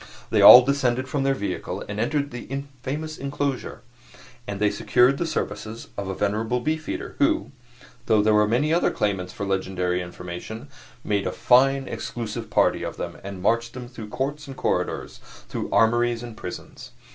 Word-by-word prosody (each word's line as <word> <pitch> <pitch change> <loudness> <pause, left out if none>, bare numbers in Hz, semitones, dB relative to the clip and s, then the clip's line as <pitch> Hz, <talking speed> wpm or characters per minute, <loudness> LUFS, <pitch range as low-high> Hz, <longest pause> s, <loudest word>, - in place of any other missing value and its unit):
They - - +3
all 125 - +12
descended 130 -2 0
from 140 +2 -1
their 135 0 +2
vehicle 100 - -4
and 100 0 -5
entered 145 +5 0
the 130 +3 -5 0.2
famous 155 +4 -4
inclosure; 140 -1 -3 0.6
and 100 -1 -4
they 105 -1 +3
secured 130 +3 +3
the 170 - -1
services 110 -5 -4
of 100 -1 -4
a 95 - -3
venerable 110 +5 0
beefeater, 155 +4 -3
who, 310 - +2 0.6
though 110 -2 +4
there 110 0 +4
were 105 0 +4
many 140 +8 +1
other 170 - +3
claimants 95 -3 -1
for 100 - -5
legendary 95 -2 -1
information, 90 +8 -8 0.3
made 100 -2 0
a - - -1
fine 135 +2 +3
exclusive 115 -3 -5
party - - +2
of - - -5
them - - -6
and 95 -2 -7
marched 115 +2 +1
them 125 -1 -7
through 115 -4 -9
courts 140 +5 -3
and 135 -1 -9
corridors, - - -2 0.3
through - - -4
armories 120 +1 +2
and 120 -2 -8
prisons. 90 -4 -9
120 Hz, 170 wpm, -24 LUFS, 105-135 Hz, 0.6 s, all